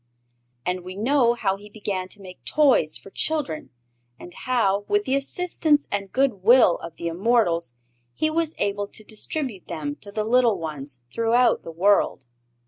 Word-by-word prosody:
And 180 0 -1
we 185 +1 -8
know 240 +2 +2
how 195 -4 0
he 205 +1 -14
began 200 -3 -4
to 205 - -11
make 185 -1 -12
toys 265 - +3
for 195 - -12
children 295 - -1 0.5
and 175 - -11
how, 205 -6 0
with 415 0 +1
the - - -1
assistance 295 +1 +1
and 195 -1 -3
goodwill 240 -5 +4
of 165 -1 -9
the 170 - -8
immortals, 170 - +1 0.4
he 310 - +1
was 325 0 -1
able 205 0 -1
to 215 - -11
distribute 215 - -4
them 150 -4 -4
to 200 - -11
the 215 +1 -2
little 235 -1 +3
ones 145 -6 -7
throughout 230 - +2
the - - -9
world. 175 -4 +2
205 Hz, 160 wpm, -24 LUFS, 180-250 Hz, 0.5 s, goodwill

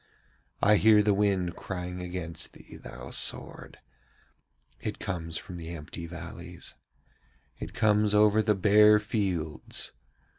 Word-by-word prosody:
I 105 +1 +6
hear 105 0 +6
the 105 -1 +3
wind 95 -4 +1
crying 90 -1 -5
against 90 -2 -5
thee, - - -14
thou - - -10
sword! - - -3 1.0
It - - -4
comes 85 -4 -4
from 90 - -7
the 85 -1 -7
empty 85 +2 -8
valleys. 85 0 -8 0.9
It - - -7
comes 105 -1 +3
over 105 +1 +5
the 105 -1 +2
bare 105 +2 +6
fields. 95 -7 -2
95 Hz, 120 wpm, -29 LUFS, 85-105 Hz, 1.0 s, I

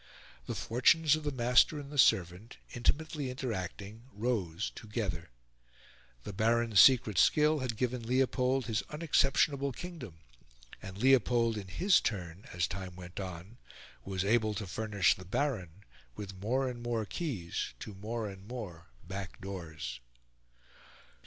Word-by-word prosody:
The - - -3
fortunes 150 +6 +3
of 155 - -6
the 145 - -1
master 125 +4 +4
and 140 0 -9
the 145 - -3
servant, 90 +2 +3 0.2
intimately 145 +3 -1
interacting, 110 -3 -5
rose 100 - -2
together. 105 - -4 0.9
The 105 - -6
Baron's 115 0 +2
secret 120 -8 +6
skill 150 - +4
had 125 -4 -3
given 125 -1 -2
Leopold 130 0 +1
his 110 -1 0
unexceptionable 140 -2 +2
kingdom; 155 - -8 0.7
and 95 -1 -8
Leopold, 120 -1 +3
in 100 -3 -6
his 185 - +3
turn, 90 -4 -4
as 85 -1 0
time 90 0 -6
went 90 +1 -9
on, 95 +4 -7 0.4
was 95 0 -2
able 110 0 +2
to 105 0 -4
furnish 100 -4 +2
the 95 - -11
Baron 95 - -2 0.3
with 100 -1 -7
more 120 +8 -1
and 120 -2 -5
more 120 -2 -1
keys 100 - -4
to 105 - -7
more 110 +3 -4
and 95 0 -10
more 100 -9 -7 0.2
back 95 +1 -6
doors. 80 - -6
110 Hz, 135 wpm, -32 LUFS, 95-130 Hz, 0.9 s, secret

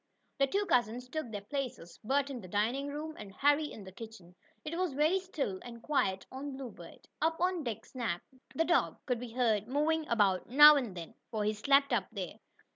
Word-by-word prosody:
The 275 - +4
two 400 +8 0
cousins 245 - +1
took 310 -2 -4
their 205 -2 -5
places, 240 -8 -5
Bert 275 +4 +1
in 250 -3 -6
the 185 - -10
dining 225 +9 0
room, 300 +2 -5
and 205 -2 -8
Harry 290 +2 +3
in 210 - -9
the 190 - -10
kitchen. 190 -4 -11 0.3
It 305 +2 -3
was 360 -4 -1
very 310 +7 +3
still 295 - -3
and 235 -1 -9
quiet 190 -11 0
on 265 +2 -6
the - - -7
Bluebird. 225 -11 -10
Up 325 +1 +1
on 360 -2 +1
deck 235 -6 -4
Snap, 230 -9 -3 0.3
the 325 - +2
dog, 340 0 +2
could 250 -3 0
be 240 -2 -7
heard 225 -4 +1
moving 305 +4 +1
about 200 -5 +2
now 295 +4 +10
and 235 -10 -2
then, 165 -1 -7 0.2
for 215 -2 -2
he 210 +1 +1
slept 275 +5 +3
up 200 -6 +1
there. 190 -6 -6
250 Hz, 205 wpm, -32 LUFS, 210-295 Hz, 0.3 s, now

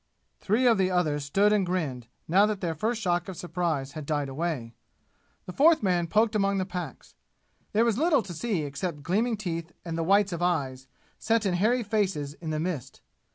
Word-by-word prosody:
Three 220 +6 +1
of 230 -4 +5
the 185 -1 +3
others 155 -6 0
stood 200 +8 +3
and 205 -2 +3
grinned, 155 -10 -2 0.2
now 195 +5 +5
that 210 -2 -2
their 170 -3 -2
first 220 +9 -1
shock 175 -4 0
of 185 - -7
surprise 165 -6 -2
had 150 -1 -8
died 145 -3 -1
away. 135 -5 -3 0.7
The 180 - -7
fourth 310 - +5
man 175 -3 +1
poked 215 +5 +2
among 200 -2 +1
the 185 - 0
packs. 180 -1 -7 0.6
There 220 +3 +3
was 230 0 +1
little 305 -6 +3
to 185 - -8
see 175 0 -1
except 145 +1 -4
gleaming 220 +7 +1
teeth 170 -5 -4
and 165 -1 -4
the - - 0
whites 195 +2 +3
of 170 - -4
eyes, 135 -7 -1 0.3
set 225 -1 +1
in 190 - +1
hairy 230 +7 +2
faces 190 -9 -1
in 160 0 -7
the 155 0 -1
mist. 155 -6 -4
180 Hz, 200 wpm, -27 LUFS, 155-210 Hz, 0.7 s, of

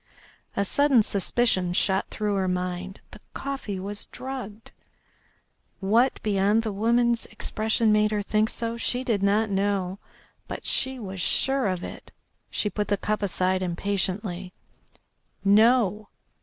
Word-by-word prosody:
A 200 - +2
sudden 275 0 +4
suspicion 195 -2 +1
shot 190 +1 +1
through 210 -1 -1
her 190 -1 0
mind. 180 +1 -3
The - - -11 0.2
coffee 270 -8 -4
was 205 +2 -4
drugged. 245 -5 -7 1.1
What 225 +7 +2
beyond 205 +1 +2
the 220 - -2
woman's 235 +3 +2
expression 220 +1 0
made 210 0 +4
her 210 -1 -1
think 215 +1 +1
so 230 0 -3
she 245 +2 -1
did 225 -6 0
not 205 +2 +2
know, 195 -1 0 0.5
but - - -6
she 265 0 0
was 190 -5 -6
sure 270 +6 +1
of 185 -2 -2
it. - - -9 0.4
She - - -1
put 210 0 -2
the 205 - +1
cup 210 +2 -1
aside 185 -1 +1
impatiently. 185 0 -2 0.9
"No. 215 0 +4
205 Hz, 135 wpm, -26 LUFS, 190-225 Hz, 1.1 s, sudden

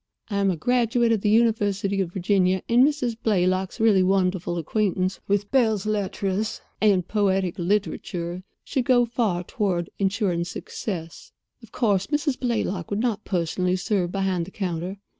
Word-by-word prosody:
I 200 - 0
am 200 -1 +2
a 185 - +1
graduate 240 - +2
of 220 -3 +1
the 210 - +1
University 205 -3 +2
of 175 -3 -3
Virginia; 185 0 +1
and 240 +2 +5
Mrs. 270 -5 +1
Blaylock's 185 -2 +1
really 220 -4 +4
wonderful 185 -2 +1
acquaintance 185 +2 -1
with 205 0 0
belles 220 -6 +2
lettres 205 0 -1 0.2
and 195 -5 +3
poetic 190 -4 0
literature 180 -2 -2 0.2
should 260 -3 -2
go 245 -1 +4
far 220 -7 -1
toward 180 -3 -2
insuring 195 -3 0
success. 175 -1 -6 0.3
Of 230 -2 -15
course, 205 -7 +1
Mrs. 295 -2 -1
Blaylock 215 -8 -2
would 205 - -1
not 225 -3 -1
personally 180 0 0
serve 185 -1 -1
behind 190 -3 -1
the - - -10
counter. 185 -1 -3
195 Hz, 150 wpm, -24 LUFS, 185-220 Hz, 0.3 s, and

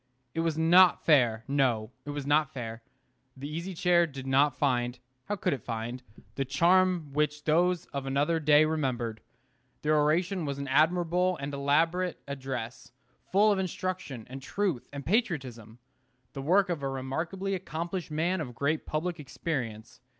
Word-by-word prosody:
It - - -3
was 165 -1 0
not 175 +2 +5
fair; 120 -8 +4
no, 130 -6 +1
it - - -7
was 145 -1 -4
not 145 0 +2
fair. 115 -3 -6 0.6
The 140 +2 -6
Easy 170 +5 -5
Chair 175 0 +3
did 135 -3 -8
not 135 +1 +3
find 125 -3 0 0.3
how 205 - -2
could 190 - 0
it 135 - -4
find? 115 +2 -5 0.3
the 135 - -1
charm 170 +2 +2
which 150 0 0
those 175 +2 +2
of 140 -1 -3
another 145 +5 +1
day 150 0 +5
remembered. 125 -8 -2 0.6
The 150 - +1
oration 165 +5 +2
was 140 -1 -3
an 140 0 -5
admirable 175 +5 +2
and 140 +1 -5
elaborate 165 +6 +1
address, 130 -4 -6 0.4
full 210 +3 +5
of 200 - +1
instruction 185 - -4
and 135 +2 -8
truth 175 -2 -2
and 140 -1 -7
patriotism, 135 - -1 0.6
the 135 - -5
work 185 +7 +3
of 170 -5 -2
a 135 - -2
remarkably 160 +9 -3
accomplished 170 0 -4
man 165 +4 0
of 125 -5 -6
great 145 +5 -1
public 165 +2 -2
experience. 130 -6 -5
150 Hz, 155 wpm, -29 LUFS, 135-175 Hz, 0.6 s, not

